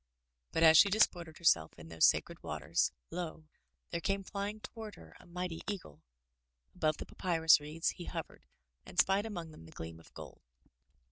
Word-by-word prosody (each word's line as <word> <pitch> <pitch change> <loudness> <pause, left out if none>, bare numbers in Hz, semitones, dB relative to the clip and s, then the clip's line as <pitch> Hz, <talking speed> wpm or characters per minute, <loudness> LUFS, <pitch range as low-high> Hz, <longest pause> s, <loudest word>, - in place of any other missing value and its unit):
But 165 - +1
as 160 -1 +9
she 200 - +7
disported 175 -6 +1
herself 85 - +3
in 80 0 -11
those 80 -1 +5
sacred - - 0
waters, - - 0 0.2
lo! 165 -3 -5 0.5
there 170 - -2
came 195 +1 -1
flying 200 +2 -4
toward 220 -1 -8
her 80 0 -15
a - - -17
mighty 175 -1 -4
eagle. 175 - -6 0.7
Above 155 -1 0
the - - -6
papyrus 165 -4 +4
reeds 150 +3 -2
he 175 - -9
hovered - - -7 0.4
and - - -13
spied 195 +3 +3
among 170 -7 -6
them 80 - -13
the - - -14
gleam 80 0 -8
of 80 - -18
gold. - - -10
165 Hz, 175 wpm, -33 LUFS, 155-195 Hz, 0.7 s, as